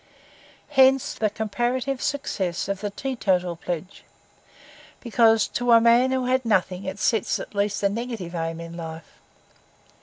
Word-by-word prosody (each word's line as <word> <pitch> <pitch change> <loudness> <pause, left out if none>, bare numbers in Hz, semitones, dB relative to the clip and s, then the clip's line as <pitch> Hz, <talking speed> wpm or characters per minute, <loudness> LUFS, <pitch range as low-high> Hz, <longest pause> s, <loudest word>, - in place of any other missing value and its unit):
Hence 265 0 +4
the 215 - 0
comparative 240 +5 -2
success 190 - -2
of 200 -1 -3
the 205 - -2
teetotal 195 -7 -1
pledge; 175 +2 -6 1.0
because 225 -2 +3
to 245 -1 +1
a 230 - +8
man 235 +3 +4
who 260 -1 0
had 255 +1 +1
nothing 190 -4 0
it 190 +1 -4
sets 220 -1 0
at - - -8
least 205 0 -1
a 200 - +4
negative 220 -5 -5
aim 165 -1 -3
in 170 0 -8
life. 160 -1 -9
210 Hz, 145 wpm, -24 LUFS, 180-245 Hz, 1.0 s, a